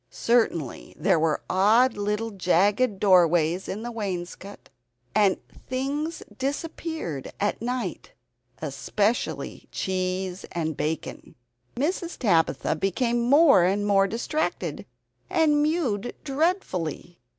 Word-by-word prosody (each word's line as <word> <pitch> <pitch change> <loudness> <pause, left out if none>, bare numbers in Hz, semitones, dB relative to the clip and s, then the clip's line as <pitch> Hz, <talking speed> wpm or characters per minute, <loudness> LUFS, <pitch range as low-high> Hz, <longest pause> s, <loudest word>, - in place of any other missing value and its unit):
Certainly 220 - 0
there 185 -4 +2
were 155 -1 0
odd 220 +7 +4
little 210 +2 -2
jagged 200 +4 +2
doorways 175 -2 +4
in 210 +3 -4
the 240 - -4
wainscot, 195 -2 -6 0.5
and 200 -3 +3 0.3
things 285 +5 -2
disappeared 285 - -4
at 205 +1 -1
night 250 +1 -4 0.5
especially 215 +3 -2
cheese 185 0 -2
and 160 -2 -2
bacon. 155 +2 -4 0.4
Mrs. 340 +6 -2
Tabitha 165 - +2
became 235 +7 0
more 275 - +6
and 200 +3 +1
more 195 -1 +4
distracted 240 +9 -3 0.4
and 310 -4 +3
mewed 275 - 0
dreadfully. 270 - -2
205 Hz, 100 wpm, -25 LUFS, 185-260 Hz, 0.5 s, more